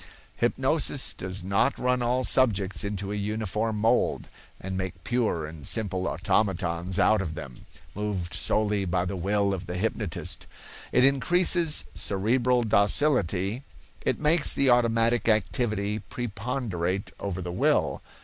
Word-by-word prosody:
Hypnosis - - +2
does 95 0 -5
not 100 +1 +1
run 125 0 0
all 125 +2 0
subjects 105 -7 +2
into 100 -1 -4
a - - -2
uniform 105 +1 -2
mold, 110 +2 +1 0.3
and 95 0 -5
make 95 -2 -5
pure 115 -10 -1
and 75 -1 -10
simple 95 -4 0
automatons 90 -1 0
out 110 -2 +3
of 80 -5 -5
them, 65 -6 -10 0.3
moved 100 -4 -4
solely 105 -2 +1
by 90 0 0
the 95 - -4
will 100 +2 0
of 95 -1 -6
the 90 - -4
hypnotist; 105 -3 -3 0.4
it 125 - +4
increases 165 +4 +3
cerebral 120 +5 +1
docility; 105 - +2 0.4
it - - -1
makes 150 +1 +3
the 135 -2 +3
automatic 115 -1 +2
activity 105 0 0
preponderate 100 -4 -4
over 95 -2 -4
the 90 -1 -5
will. - - +1
105 Hz, 130 wpm, -26 LUFS, 95-120 Hz, 0.4 s, it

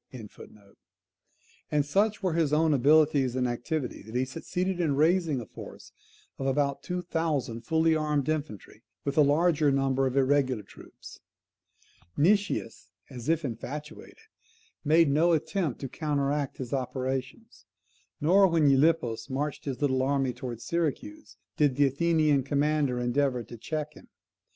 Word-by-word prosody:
] - - -53 1.6
and 150 -1 +2
such 205 +7 0
were 185 -3 +1
his 160 -3 +1
own 155 +1 +3
abilities 145 -1 +3
and 125 -1 0
activity, 125 +3 -3
that 110 +3 -11
he 130 +1 +1
succeeded 180 +6 -3
in 155 -5 +1
raising 160 -1 +2
a 120 - -7
force - - -12 0.5
of 135 - -2
about 140 0 0
two 180 0 -4
thousand 155 -9 -2
fully 160 +5 +2
armed 150 -2 0
infantry, 150 - -4 0.2
with 140 - -2
a 155 - +5
larger 150 +1 +3
number 135 -1 +1
of 130 +1 -3
irregular 130 -4 +2
troops. - - -14 1.0
Nicias, 195 - 0 0.2
as 125 +1 -6
if 165 -1 +1
infatuated, 145 +6 -7 0.7
made 160 +2 +4
no 165 +4 +3
attempt 160 - -1
to 135 - -3
counteract 145 -1 -2
his 130 -1 -6
operations; 130 - -4 0.5
nor, 190 +6 +5
when 165 -4 +3
Gylippus 135 -6 +1
marched 145 +2 -3
his 135 -2 -4
little 130 -2 +1
army 135 -1 0
towards 120 -3 -7
Syracuse, 170 - -3 0.2
did 145 -4 +2
the 145 +1 +4
Athenian 155 0 +2
commander 140 -1 0
endeavour 125 0 0
to 120 - -11
check 150 +5 -5
him. - - -16
145 Hz, 140 wpm, -28 LUFS, 130-160 Hz, 1.6 s, a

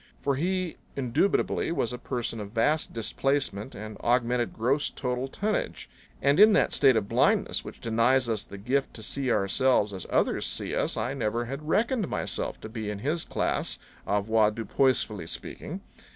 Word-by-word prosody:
For 140 -1 0
he 180 +3 -1 0.2
indubitably 140 +10 +1
was 125 -8 0
a 125 - -5
person 120 -2 -3
of 105 0 -7
vast 150 +7 +1
displacement 130 -1 -1
and 110 0 -7
augmented 120 0 +1
gross 135 +6 0
total 125 0 -3
tonnage; 210 +9 -2 0.4
and 140 +4 +4
in 215 +1 +8
that - - +3
state 135 -3 +5
of 105 -3 0
blindness - - +2
which - - -9
denies 115 +3 +2
us 110 -2 -1
the 100 - -10
gift 130 +7 -1
to 110 - -7
see 130 +3 -1
ourselves 105 +1 +2
as 95 -3 -6
others - - +1
see - - -2
us - - 0
I - - -1
never 115 +3 -1
had 140 +5 -6
reckoned 225 +1 +2
myself - - -3
to - - -6
be 110 -2 -4
in 105 - -3
his 155 +10 -1
class, - - -1 0.3
avoir 105 +1 +3
dupoisefully 110 -4 0
speaking. - - -6
125 Hz, 165 wpm, -27 LUFS, 110-140 Hz, 0.4 s, in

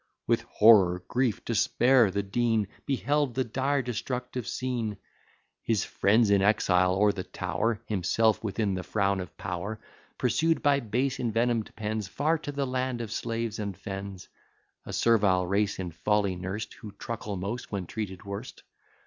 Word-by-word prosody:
With - - +2
horror, 95 -5 +6
grief, 125 -3 0
despair, 120 +1 +4
the 100 +2 -1
Dean 110 0 +1 0.2
Beheld 140 -1 0
the 130 - +2
dire 135 +3 0
destructive 125 +1 -4
scene: 120 -5 -2 0.6
His 110 -4 +1
friends 105 +1 +3
in 100 -1 +5
exile, 95 -3 +3
or 105 +1 +4
the 95 -2 -5
tower, 105 +6 -2
Himself 110 +3 +1
within 105 -1 -1
the 95 - -2
frown 100 0 0
of 90 - -8
power, 95 +4 -4 0.4
Pursued 160 +7 +1
by 140 -1 +4
base 125 +3 -1
envenom'd 115 -1 0
pens, 110 -2 -3
Far 155 - 0
to 145 - -5
the 140 -1 -1
land 130 -1 -2
of 115 -3 -5
slaves 115 -1 -3
and 100 -4 -4
fens; 95 -2 -7 0.6
A - - -5
servile 100 -6 +3
race 100 +2 0
in 90 -2 -4
folly 100 +3 +1
nursed, 95 +4 -5
Who 105 -4 -9
truckle 105 -1 -5
most, 100 +7 -5
when 100 -3 -3
treated 95 -2 -6
worst. 100 +6 -7
110 Hz, 155 wpm, -28 LUFS, 100-120 Hz, 0.6 s, horror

